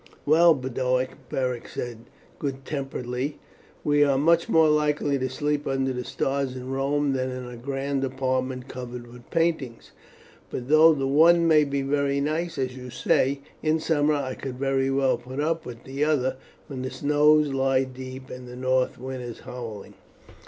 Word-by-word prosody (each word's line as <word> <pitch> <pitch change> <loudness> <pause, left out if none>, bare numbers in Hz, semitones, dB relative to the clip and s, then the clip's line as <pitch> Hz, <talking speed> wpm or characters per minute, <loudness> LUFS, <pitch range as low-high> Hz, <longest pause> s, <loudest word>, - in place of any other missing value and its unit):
"Well, 165 +2 +6
Boduoc," 130 0 -1 0.2
Beric 125 -2 -2
said 120 -1 -6 0.3
good 135 -2 -4
temperedly, 135 -1 -3 0.5
"we 145 0 +4
are 140 -2 +3
much 165 +4 +3
more 160 -1 +5
likely 150 -2 +2
to 130 0 -1
sleep 145 +2 -1
under 135 -1 0
the 125 0 -3
stars 135 +1 -2
in 130 0 -6
Rome 140 +1 +1
than 130 -1 -1
in 130 0 -5
a 125 - -8
grand 135 +2 -2
apartment 130 -1 -2
covered 125 -2 -7
with 120 0 -14
paintings; 160 -8 -1 0.6
but 125 +1 -5
though 155 +1 +7
the 135 -2 -1
one 165 +5 +5
may 155 -2 +6
be 140 -1 -1
very 140 0 +1
nice, 160 +4 -1
as 130 -1 -2
you 125 -1 -8
say, 135 +2 +1 0.2
in 155 +1 +2
summer, 150 -1 +2
I 130 -3 -2
could 130 -1 -6
very 135 0 +1
well 135 -1 +2
put 130 +3 -7
up 160 +2 -1
with 120 -1 -9
the 135 +2 -2
other 130 -4 +1 0.3
when 135 -4 -6
the 130 - -3
snow 150 +2 +3
lies 135 -3 +2
deep 130 0 -8
and 125 0 -8
the 125 - -9
north 130 0 +1
wind 130 +1 -6
is 120 -2 -7
howling." 115 -5 -8
135 Hz, 175 wpm, -25 LUFS, 130-145 Hz, 0.6 s, though